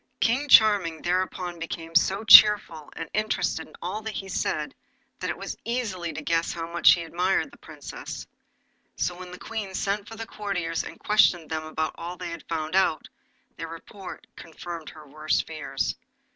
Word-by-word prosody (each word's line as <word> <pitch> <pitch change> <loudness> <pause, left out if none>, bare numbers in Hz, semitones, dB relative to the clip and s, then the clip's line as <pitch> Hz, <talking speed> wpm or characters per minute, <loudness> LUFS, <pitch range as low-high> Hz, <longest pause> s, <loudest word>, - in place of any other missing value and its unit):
King 265 +6 +1
Charming 200 -9 +5
thereupon 180 -1 -1
became 165 0 -6
so 190 +5 +3
cheerful, 205 -7 +7
and 165 - -5
interested 215 -6 -1
in - - -16
all 205 +5 -4
he 210 -3 -5
said, 190 - -2 0.5
that - - -3
it - - -3
was - - -6
easy 205 -8 -3
to 150 0 -7
guess 165 +2 +1
how 165 -1 -5
much 170 - +7
he 170 - -2
admired 180 - 0
the 285 - -17
Princess. - - -8 0.7
So 180 - -1
when 180 0 -10
the 180 - -9
Queen 205 -3 -5
sent 200 +2 -1
for 225 - -9
the 225 0 -6
courtiers 180 -7 -3
and - - -10
questioned 175 -6 +3
them 155 0 -2
about 155 0 -2
all 175 +2 -6
they - - -5
had 170 -1 -9
found 160 0 -2
out, 190 -4 +2 0.5
their 165 - -5
report 180 +4 -10
confirmed 165 -1 -8
her 155 -1 -13
worst 155 +2 -1
fears. 145 -4 -3
175 Hz, 170 wpm, -26 LUFS, 165-205 Hz, 0.7 s, cheerful